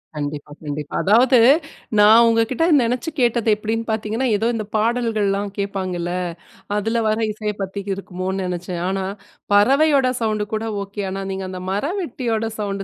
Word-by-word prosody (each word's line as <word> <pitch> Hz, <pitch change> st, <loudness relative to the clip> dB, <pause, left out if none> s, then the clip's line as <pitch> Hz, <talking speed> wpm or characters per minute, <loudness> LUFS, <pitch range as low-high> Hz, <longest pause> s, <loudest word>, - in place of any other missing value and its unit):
கண்டிப்பா, 145 Hz, 0 st, -5 dB
கண்டிப்பா. 145 Hz, 0 st, -5 dB
அதாவது 240 Hz, +6 st, +5 dB, 0.6 s
நான் 220 Hz, +3 st, +8 dB
உங்ககிட்ட 230 Hz, +6 st, +1 dB, 0.2 s
நெனைச்சு 250 Hz, +7 st, -1 dB
கேட்டது 235 Hz, -2 st, +2 dB
எப்டின்னு 220 Hz, +2 st, -3 dB
பார்த்தீங்கன்னா, 220 Hz, +4 st, -1 dB
ஏதோ 220 Hz, +3 st, 0 dB
இந்த 215 Hz, -2 st, -3 dB
பாடல்கள்லாம் 215 Hz, -3 st, 0 dB
கேட்பாங்கல, 185 Hz, -3 st, -3 dB, 0.7 s
அதில 225 Hz, +3 st, 0 dB
வர 215 Hz, 0 st, +1 dB
இசைய 210 Hz, 0 st, -3 dB
பத்தி 195 Hz, +1 st, -4 dB
இருக்குமோன்னு 190 Hz, 0 st, -4 dB
நெனைச்சேன். 180 Hz, -1 st, -4 dB
ஆனா, 195 Hz, 0 st, -1 dB, 0.5 s
பறவையோட 275 Hz, +6 st, +4 dB
சவுண்ட் 215 Hz, -2 st, 0 dB
கூட 220 Hz, +1 st, -1 dB, 0.2 s
ஓகே 200 Hz, +1 st, -6 dB
ஆனா, 195 Hz, +1 st, -4 dB
நீங்க 190 Hz, 0 st, -4 dB
அந்த 185 Hz, -1 st, -6 dB
மரவெட்டியோட 250 Hz, -, -2 dB, 0.2 s
சவுண்ட் 200 Hz, -1 st, -3 dB
210 Hz, 135 wpm, -21 LUFS, 195-230 Hz, 0.7 s, நான்